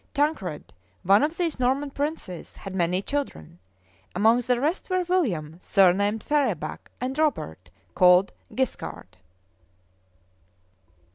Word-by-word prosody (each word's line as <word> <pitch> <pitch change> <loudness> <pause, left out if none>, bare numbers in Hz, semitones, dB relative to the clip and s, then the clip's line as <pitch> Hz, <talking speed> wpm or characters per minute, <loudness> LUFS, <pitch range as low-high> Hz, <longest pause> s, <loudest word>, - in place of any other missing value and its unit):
Tancred, 280 - -1 0.3
one 195 +3 +5
of 310 +3 0
these 335 -6 -1
Norman 270 +3 +1
princes, 280 - -5
had 195 - -8
many 180 +1 0
children; 200 - -4 0.6
among 225 +6 +4
the 245 0 +1
rest 315 +10 -1
were 370 0 +1
William, 190 - -1
surnamed 200 +3 +3
Ferabac, 295 -1 -1
and 255 +1 -3
Robert, 90 - -1 0.2
called 180 +1 +5 0.2
Guiscard. 95 - -4
235 Hz, 110 wpm, -25 LUFS, 180-290 Hz, 0.6 s, one